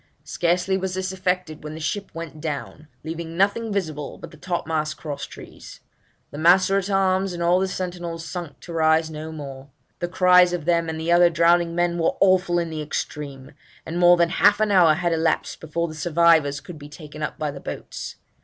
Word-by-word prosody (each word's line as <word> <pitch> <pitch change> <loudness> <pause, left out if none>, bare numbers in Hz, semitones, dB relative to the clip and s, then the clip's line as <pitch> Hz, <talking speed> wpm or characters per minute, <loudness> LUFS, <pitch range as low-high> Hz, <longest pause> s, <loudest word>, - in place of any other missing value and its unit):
'Scarcely 180 +3 0
was 190 -1 -3
this 190 0 -2
effected 180 -4 -2
when 150 0 -7
the - - -7
ship 195 +6 -3
went 165 -2 -7
down, 150 0 -5 0.2
leaving 165 +1 -6
nothing 205 +4 +1
visible 155 -8 -3
but - - -10
the - - -13
top 175 +2 -3
mast 155 -1 -2
cross 145 -3 -6
trees. - - -12 0.5
The 145 - -7
master 185 +4 +5
at 195 +1 -5
arms 190 -1 +1
and 170 0 -3
all 175 +2 +3
the 190 - 0
sentinels 175 -3 -5
sunk 170 -3 -7
to 170 - -9
rise 160 0 +2
no 155 +1 -7
more. 140 -3 -9 0.3
The 175 - -2
cries 180 0 +5
of 170 -4 -3
them 170 -1 +1
and 160 0 -4
the 165 +2 -1
other 175 0 +6
drowning 170 0 +3
men 175 0 0
were 165 - +1
awful 185 -2 +3
in 170 -1 -1
the 155 -1 -4
extreme; 145 -2 -5 0.3
and 165 +2 -4
more 175 0 +6
than 170 -1 +3
half 205 +3 +4
an 215 -1 +1
hour 170 -5 +6
had 175 0 0
elapsed 160 0 0
before 170 +2 -2
the 155 - -8
survivors 155 -3 +3
could 170 -4 -10
be 145 0 -11
taken 150 0 -11
up 150 - -3
by 150 -2 -2
the 140 - -9
boats. - - -7
170 Hz, 205 wpm, -23 LUFS, 155-180 Hz, 0.5 s, other